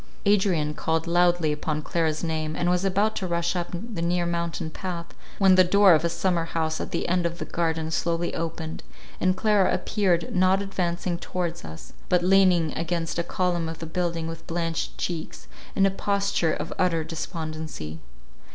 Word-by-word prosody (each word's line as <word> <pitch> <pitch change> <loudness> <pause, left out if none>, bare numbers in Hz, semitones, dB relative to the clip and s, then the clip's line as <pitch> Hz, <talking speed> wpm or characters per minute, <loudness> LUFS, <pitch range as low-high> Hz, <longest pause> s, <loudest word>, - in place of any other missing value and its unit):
Adrian 190 -7 +2
called 160 +1 -1
loudly 175 -2 +3
upon 150 +1 -2
Clara's 160 -1 0
name, 155 -1 -2
and 175 0 +1
was 180 +1 +1
about 200 +3 +1
to 190 - -2
rush 170 +1 0
up 175 -1 -1
the 185 0 -5
near 175 +1 +1
mountain 170 -1 -2
path, 170 -1 -5 0.2
when 195 -1 +6
the 185 0 +7
door 195 +1 +6
of 160 - +3
a 170 - +2
summer 170 0 0
house 160 -1 -1
at - - -4
the - - -2
end 180 0 +1
of 170 0 -2
the - - -5
garden 160 -1 -1
slowly 170 +1 0
opened, 160 -1 -4 0.4
and 185 +1 +2
Clara 210 -3 +3
appeared, 185 -3 0
not 185 +1 +4
advancing 180 -3 -2
towards 175 -2 -3
us, 80 0 -10 0.2
but 180 -1 +3
leaning 180 -4 +4
against 165 0 -2
a - - +1
column 175 -2 -1
of 165 - -6
the 165 - -6
building 170 0 -2
with 165 0 -7
blanched 165 -1 -2
cheeks, 170 -3 -4 0.3
in 195 - +4
a 195 - +3
posture 200 -4 0
of 155 +2 -3
utter 165 -3 +2
despondency. 155 - -5
170 Hz, 180 wpm, -25 LUFS, 160-185 Hz, 0.4 s, the